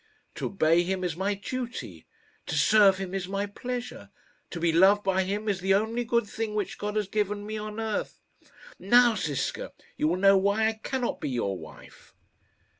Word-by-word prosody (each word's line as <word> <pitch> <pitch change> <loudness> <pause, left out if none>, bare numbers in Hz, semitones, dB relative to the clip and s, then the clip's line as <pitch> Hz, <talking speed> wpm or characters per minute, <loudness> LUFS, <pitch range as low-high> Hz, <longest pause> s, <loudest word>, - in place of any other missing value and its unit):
To - - -3
obey 165 -3 +3
him 185 +1 -2
is 175 -3 -2
my 195 +3 -1
duty; 245 +4 -6 0.4
to - - -2
serve 205 -3 +5
him 190 -1 -5
is 190 -2 -3
my 200 +1 -2
pleasure. 245 +4 -6 0.4
To 170 - -6
be 165 0 +2
loved 195 +4 +5
by 190 -1 +1
him 205 +3 -3
is 200 -3 0
the 195 +1 +2
only 225 +4 0
good 235 -1 +1
thing 215 0 -4
which 210 -3 -3
God 210 0 -3
has 210 -2 0
given 205 0 -2
me 215 +1 -5
on 210 +1 -6
earth. 220 -2 -3 0.6
Now, 240 +4 +5
Ziska, 150 -9 -3 0.2
you 150 - +1
will 175 +3 +1
know 195 +1 +5
why 200 +3 +2
I - - -2
cannot 245 +3 -3
be - - -2
your 115 -6 -1
wife." 80 -3 -13
200 Hz, 190 wpm, -27 LUFS, 185-220 Hz, 0.6 s, serve